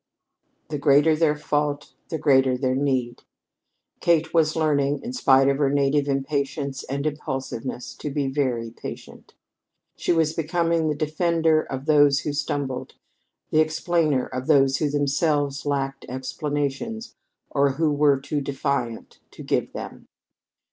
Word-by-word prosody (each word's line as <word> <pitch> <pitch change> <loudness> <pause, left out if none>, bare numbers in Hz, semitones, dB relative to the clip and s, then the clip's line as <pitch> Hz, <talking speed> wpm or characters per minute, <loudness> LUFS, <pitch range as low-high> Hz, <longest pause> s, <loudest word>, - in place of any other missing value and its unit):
The 150 -2 -3
greater 145 +2 +4
their 155 -1 +2
fault 145 -1 -2 0.2
the 160 - -2
greater 135 -4 +3
their 130 0 0
need. 130 -3 -1 0.8
Kate 165 -2 +2
was 160 -2 +3
learning, 145 -3 +1
in 240 +2 -5
spite 135 - +4
of 140 0 +1
her 140 -2 +3
native 140 +1 +1
impatience 140 0 -2
and 140 +2 -3
impulsiveness, 135 -4 -4
to 150 - -5
be 145 0 -1
very 130 -5 -1
patient. - - -10 0.6
She - - -1
was 160 -2 +2
becoming 165 0 0
the 150 - 0
defender 160 +1 +1
of 135 -2 -6
those 145 -2 +4
who 150 - -3
stumbled, 140 -2 -3 0.6
the 155 - +3
explainer 155 -3 +1
of 130 0 -6
those 135 -3 +4
who 150 - 0
themselves 145 0 0
lacked 135 -1 -2
explanations 145 - -3 0.4
or 140 -1 +2
who 155 +2 +1
were 145 -2 +3
too 140 +2 -3
defiant 135 -4 -3
to - - -11
give - - -1
them. - - -8
145 Hz, 140 wpm, -24 LUFS, 135-155 Hz, 0.8 s, greater